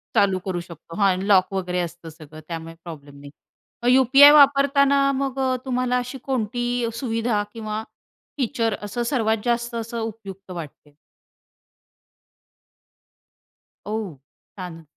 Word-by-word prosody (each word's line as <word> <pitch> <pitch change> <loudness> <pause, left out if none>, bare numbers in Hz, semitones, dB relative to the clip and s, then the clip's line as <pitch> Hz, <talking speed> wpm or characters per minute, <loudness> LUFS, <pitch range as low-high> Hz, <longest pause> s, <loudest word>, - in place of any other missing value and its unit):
चालू 195 -2 +3
करू 185 -2 -2
शकतो, 170 -1 -12
हां 200 -2 +3
आणि 185 +1 -2
लॉक 195 -1 +4
वगैरे 180 -1 -2
असतं 175 -1 -5
सगळं 155 -1 -13
त्यामुळे 165 -1 -6
प्रॉब्लेम 145 -4 -11
नाही. 140 0 -12 0.5
मग 245 - +3
यू-पी-आय 265 +3 +8
वापरताना 280 -1 +5 0.2
मग 270 -1 -3
अ, 260 -1 +1
तुम्हाला 250 -1 0
अशी 250 +2 -4
कोणती 240 -1 -1 0.3
सुविधा 230 -3 -1
किंवा 215 -1 -4 0.5
फीचर 230 -4 0
असं 210 +4 -3
सर्वात 225 -3 +1
जास्त 235 0 -1
असं 230 0 -4
उपयुक्त 200 -4 -7
वाटते. 150 -3 -10 2.9
औ, 210 - -6 0.7
छान. 175 -3 -8
220 Hz, 125 wpm, -23 LUFS, 180-250 Hz, 2.9 s, यू-पी-आय